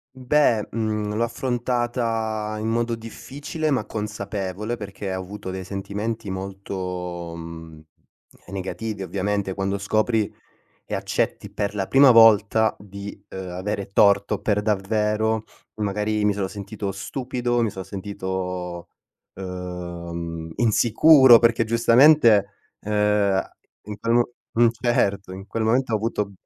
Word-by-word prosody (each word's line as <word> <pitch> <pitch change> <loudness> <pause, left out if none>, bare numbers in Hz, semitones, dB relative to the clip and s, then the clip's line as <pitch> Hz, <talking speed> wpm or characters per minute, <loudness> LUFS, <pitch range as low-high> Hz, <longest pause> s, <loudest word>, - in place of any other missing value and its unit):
Mhmm, 130 - -12
beh, 125 -6 +3
mhmm, 105 -2 -2
l'ho 115 - +1
affrontata 120 -3 -1
in 110 - -3
modo 115 +1 0
difficile 140 +7 -5
ma 125 -6 0
consapevole, 105 0 -4
perché 100 -2 -6
ho 95 - -3
avuto 95 +1 -8
dei 95 0 -5
sentimenti 105 +3 -4
molto, 90 -3 -5
mhmm, 80 -1 -9 0.7
ehm, 100 - -11
negativi 100 +2 -4
ovviamente. 95 +1 -2
Quando 100 +1 -2
scopri 110 +2 0 0.5
e - - -3
accetti - - -2
per 100 0 -3
la 95 -2 -2
prima 135 -1 +7
volta 110 -1 +5
di, 100 0 -9
uhm, 95 -1 -6
avere 100 +2 -4
torto 100 0 +4
per 105 -1 +1
davvero, 105 +1 0 0.3
magari 105 0 -1
mi 105 - +3
sono 100 -1 -2
sentito 100 0 -5
stupido, 120 +4 -2
mi 115 - +1
sono 95 -1 -7
sentito, 95 -3 -5 0.5
uhm, 85 -3 -6
insicuro, 120 +3 +6
perché 115 -1 +3
giustamente, 115 -1 +5 0.3
uhm, 105 - -5 0.4
a 95 - -3 0.3
in 105 0 -7
quel 115 - 0
m 120 0 +5 0.3
mhmm, 120 0 +5
certo. 100 -5 0
In 95 +2 -9
quel 110 +3 -2
momento 120 +2 +1
ho - - +4
avuto 105 -2 -2
105 Hz, 130 wpm, -23 LUFS, 95-115 Hz, 0.7 s, prima